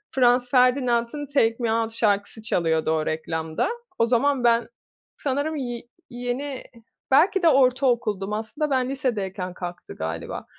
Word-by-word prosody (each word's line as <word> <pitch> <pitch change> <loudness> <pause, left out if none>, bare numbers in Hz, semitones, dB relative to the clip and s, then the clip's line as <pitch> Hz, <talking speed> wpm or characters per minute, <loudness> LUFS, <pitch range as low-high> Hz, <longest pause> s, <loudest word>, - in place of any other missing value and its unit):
Franz 245 -1 +3
Ferdinand'ın 250 +1 +2
”Take 230 -5 +2
Me 230 -2 0
Out” 225 0 -1
şarkısı 210 -1 0
çalıyordu 165 -7 0
o 155 -1 0
reklamda. 160 0 -2 0.3
O 230 - +5
zaman 255 +2 +2
ben, 235 -1 +3 0.5
sanırım 285 +3 -1
ye 245 -4 -4 0.3
yeni, 245 +3 -4 0.5
belki 350 +7 +4
de 335 - +7
ortaokuldum. 245 -7 +2
Aslında 225 +8 -3
ben 260 -1 +1
lisedeyken 200 -9 -3
kalktı 175 -1 -8
galiba. 80 +1 -5
240 Hz, 130 wpm, -24 LUFS, 205-265 Hz, 0.5 s, de